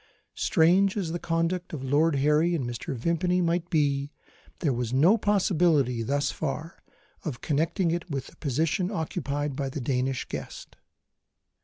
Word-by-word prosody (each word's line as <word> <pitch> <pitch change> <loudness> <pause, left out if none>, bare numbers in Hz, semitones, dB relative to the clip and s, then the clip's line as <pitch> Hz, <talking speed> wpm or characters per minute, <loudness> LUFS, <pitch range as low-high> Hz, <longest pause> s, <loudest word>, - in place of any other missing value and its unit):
Strange 190 +3 +3
as 180 -5 -2
the 175 - -3
conduct 165 +2 -1
of 140 -4 -5
Lord 145 +4 +2
Harry 150 +5 +3
and 140 -6 -2
Mr. 120 +2 -4
Vimpany 170 +7 +1
might 175 0 0
be, 140 -2 +1 0.5
there 145 -5 0
was 120 -1 -2
no 155 - +5
possibility, 170 - +2
thus 140 +4 0
far, 160 +3 -4 0.4
of 145 -8 -5
connecting 165 +4 0
it 175 +1 -3
with 135 -3 -3
the - - -15
position 160 - 0
occupied 145 -6 -3
by 135 -1 -2
the 135 - -5
Danish 130 0 -1
guest. - - -8
155 Hz, 150 wpm, -27 LUFS, 140-175 Hz, 0.5 s, no